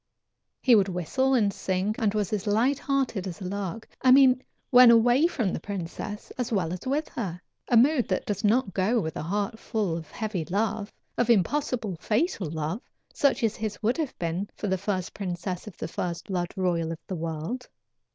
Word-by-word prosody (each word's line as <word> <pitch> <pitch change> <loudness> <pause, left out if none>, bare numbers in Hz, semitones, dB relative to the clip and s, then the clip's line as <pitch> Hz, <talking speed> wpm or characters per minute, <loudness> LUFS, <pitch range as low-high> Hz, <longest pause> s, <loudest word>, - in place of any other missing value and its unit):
He 255 - +6
would 200 -3 +5
whistle 225 - +1
and 205 -5 +2
sing, 190 +3 -1
and 215 -2 +1
was 210 -1 -1
as 210 -1 -2
light 240 +7 +2
hearted 265 -9 -1
as 170 -4 -6
a 190 - -6
lark 200 +3 -4
I 260 - +4
mean 255 -1 +7 0.3
when 250 -1 +9
away 240 +6 +5
from 230 - -1
the - - -2
princess 205 +3 -6
as 245 -1 -2
well 180 -6 0
as 185 +7 -6
with 295 +4 0
her 180 -6 -4 0.3
a 240 - +4
mood 260 +1 +4
that 185 - -1
does 205 +1 -3
not 215 -1 +2
go 205 +7 +2
with 160 -6 -3
a - - -3
heart 205 +7 -2
full 205 -8 -1
of 165 -2 -7
heavy 215 -7 -3
love, 205 +3 -1 0.3
of 240 -1 +2
impossible, 230 - +1
fatal 215 - 0
love, 160 +7 -3 0.3
such 275 -3 +2
as 220 -1 +2
his 215 0 -5
would 230 +3 +2
have 310 -5 -3
been 175 +4 -2
for - - -5
the 190 -2 +1
first 190 -2 -2
princess 180 -1 -4
of 210 - -10
the - - -4
first 170 0 -4
blood 175 -3 -2
royal 175 -4 0
of 165 - -4
the 190 - -4
world. 165 +10 -4
205 Hz, 200 wpm, -27 LUFS, 180-240 Hz, 0.3 s, when